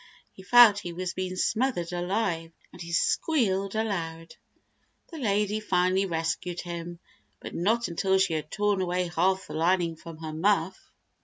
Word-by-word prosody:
He -, -, -14 dB
felt 225 Hz, 0 st, +7 dB
he 175 Hz, -3 st, -6 dB
was 180 Hz, +1 st, -4 dB
being 185 Hz, 0 st, -4 dB
smothered 215 Hz, -4 st, 0 dB
alive, 175 Hz, -2 st, -1 dB, 0.2 s
and -, -, -11 dB
he 170 Hz, 0 st, -7 dB
squealed 195 Hz, -, +1 dB
aloud. 165 Hz, -7 st, -3 dB, 0.8 s
The 325 Hz, -, -7 dB
lady 210 Hz, -3 st, 0 dB
finally 185 Hz, -1 st, +1 dB
rescued 165 Hz, +1 st, -2 dB
him, 175 Hz, 0 st, -6 dB, 0.4 s
but -, -, -8 dB
not 225 Hz, +7 st, +1 dB
until 190 Hz, +3 st, +1 dB
she 190 Hz, -3 st, +2 dB
had 155 Hz, -1 st, -3 dB
torn 205 Hz, 0 st, 0 dB
away 180 Hz, -1 st, -1 dB
half 190 Hz, +1 st, +2 dB
the -, -, -9 dB
lining 170 Hz, 0 st, +1 dB
from 165 Hz, 0 st, -11 dB
her 160 Hz, -1 st, -7 dB
muff. 185 Hz, +1 st, 0 dB
185 Hz, 155 wpm, -27 LUFS, 170-205 Hz, 0.8 s, felt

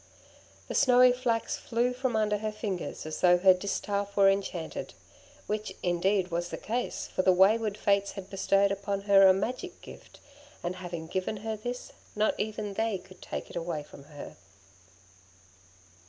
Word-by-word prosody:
The -, -, -5 dB
snowy 250 Hz, -2 st, +6 dB
flax 245 Hz, -2 st, -1 dB
flew 240 Hz, +1 st, 0 dB
from 255 Hz, -2 st, -2 dB
under 210 Hz, -1 st, +1 dB
her 215 Hz, 0 st, -2 dB
fingers 205 Hz, -7 st, -5 dB
as 155 Hz, 0 st, -5 dB
though 180 Hz, 0 st, +6 dB
her 185 Hz, +1 st, +6 dB
distaff 200 Hz, +2 st, -3 dB
were 195 Hz, -1 st, +7 dB
enchanted; 190 Hz, -4 st, -4 dB, 0.5 s
which, 210 Hz, -2 st, -3 dB
indeed, 180 Hz, +1 st, +1 dB
was 175 Hz, +1 st, -2 dB
the -, -, -5 dB
case, 240 Hz, +3 st, -3 dB
for -, -, -1 dB
the 185 Hz, -, +4 dB
wayward 205 Hz, +3 st, +3 dB
Fates 200 Hz, -1 st, +1 dB
had 195 Hz, -2 st, -8 dB
bestowed 195 Hz, 0 st, +2 dB
upon 200 Hz, 0 st, -2 dB
her 195 Hz, -1 st, +6 dB
a -, -, +8 dB
magic 250 Hz, -, -3 dB
gift, -, -, -13 dB, 0.4 s
and 175 Hz, +1 st, -3 dB
having 175 Hz, -3 st, -6 dB
given 185 Hz, +5 st, -3 dB
her 220 Hz, -1 st, -1 dB
this, 245 Hz, +4 st, -6 dB, 0.2 s
not 210 Hz, +1 st, +2 dB
even 210 Hz, -1 st, -3 dB
they 220 Hz, 0 st, 0 dB
could 185 Hz, 0 st, -16 dB
take -, -, -6 dB
it -, -, -11 dB
away 165 Hz, -3 st, -3 dB
from 140 Hz, -1 st, -14 dB
her. 145 Hz, -1 st, -10 dB
200 Hz, 165 wpm, -29 LUFS, 185-215 Hz, 0.5 s, a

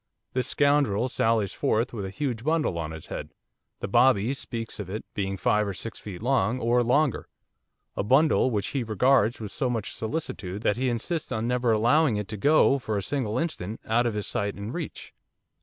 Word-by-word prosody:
This 130 Hz, 0 st, 0 dB
scoundrel 140 Hz, -5 st, +2 dB
sallies 110 Hz, -5 st, +1 dB
forth 115 Hz, +4 st, 0 dB
with 105 Hz, -4 st, -4 dB
a -, -, -4 dB
huge 120 Hz, 0 st, -3 dB
bundle 155 Hz, -, +1 dB
on 80 Hz, -2 st, -3 dB
his 80 Hz, -1 st, -8 dB
head, -, -, -6 dB, 0.5 s
the -, -, -2 dB
bobby 125 Hz, -1 st, +4 dB
speaks 120 Hz, -5 st, -5 dB
of 100 Hz, -3 st, -5 dB
it 105 Hz, +3 st, -5 dB
being 95 Hz, -1 st, -2 dB
five 105 Hz, +2 st, +2 dB
or 100 Hz, -, -4 dB
six 115 Hz, +4 st, -6 dB
feet 100 Hz, -1 st, -8 dB
long, 125 Hz, -3 st, +2 dB
or 120 Hz, +1 st, +2 dB
longer, 130 Hz, +3 st, +1 dB, 0.7 s
a -, -, 0 dB
bundle 135 Hz, +6 st, +4 dB
which 105 Hz, -5 st, -1 dB
he 135 Hz, -3 st, -1 dB
regards 120 Hz, +1 st, +3 dB
with 105 Hz, -3 st, -6 dB
so 130 Hz, -, -1 dB
much 115 Hz, -4 st, -2 dB
solicitude 110 Hz, -, -4 dB
that 105 Hz, -, +2 dB
he 130 Hz, +2 st, 0 dB
insists 145 Hz, +8 st, -2 dB
on 110 Hz, +1 st, -1 dB
never 125 Hz, -1 st, +1 dB
allowing 120 Hz, +3 st, +3 dB
it 105 Hz, -1 st, -3 dB
to 105 Hz, -, -4 dB
go, 140 Hz, +3 st, +4 dB
for 110 Hz, -4 st, -2 dB
a 100 Hz, -, -2 dB
single 125 Hz, -1 st, -1 dB
instant, 115 Hz, -, -3 dB
out 120 Hz, +2 st, +2 dB
of 115 Hz, -, -2 dB
his 105 Hz, -, -2 dB
sight 100 Hz, 0 st, -2 dB
and 100 Hz, +4 st, -6 dB
reach. 170 Hz, -3 st, -6 dB
115 Hz, 200 wpm, -26 LUFS, 105-130 Hz, 0.7 s, bobby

